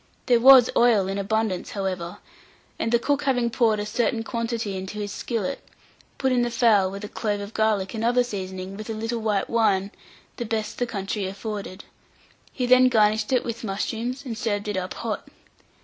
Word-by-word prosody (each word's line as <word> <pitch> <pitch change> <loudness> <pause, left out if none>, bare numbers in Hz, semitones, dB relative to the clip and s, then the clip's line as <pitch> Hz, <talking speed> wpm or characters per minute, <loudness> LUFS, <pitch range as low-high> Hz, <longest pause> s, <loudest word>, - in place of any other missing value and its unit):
There 240 -2 +4
was 260 0 +8
oil 225 -6 +4
in 195 +1 -2
abundance, 215 -2 -1
however; 185 -3 -4 0.6
and 225 - -1
the 235 - +5
cook 285 +4 -1
having 245 -3 +1
poured 225 -3 +2
a 210 - -2
certain 225 +1 0
quantity 230 -3 -3
into 190 +2 -6
his 205 -1 -4
skillet, 240 +3 -3 0.5
put 265 -1 +1
in 250 -1 +3
the 240 - +1
fowl, 215 -5 +3
with 195 +2 -7
a - - -4
clove 205 -1 -2
of 200 +2 -7
garlic 215 -3 +1
and 225 -1 -3
other 245 +1 +3
seasoning, 190 -4 -6
with 215 +1 -8
a 225 - -3
little 225 +2 -3
white 210 -3 0
wine, 205 -4 +1 0.5
the 240 - -3
best 220 -1 -3
the 245 - 0
country 195 -2 -3
afforded; 200 -1 -6 0.7
he 250 - -2
then 255 +1 +6
garnished 215 -1 +2
it 255 - +2
with 235 0 -5
mushrooms, 230 +6 -3
and 230 -3 -5
served 205 -4 -2
it 210 - -2
up 185 0 -3
hot. - - -4
220 Hz, 190 wpm, -24 LUFS, 200-235 Hz, 0.7 s, was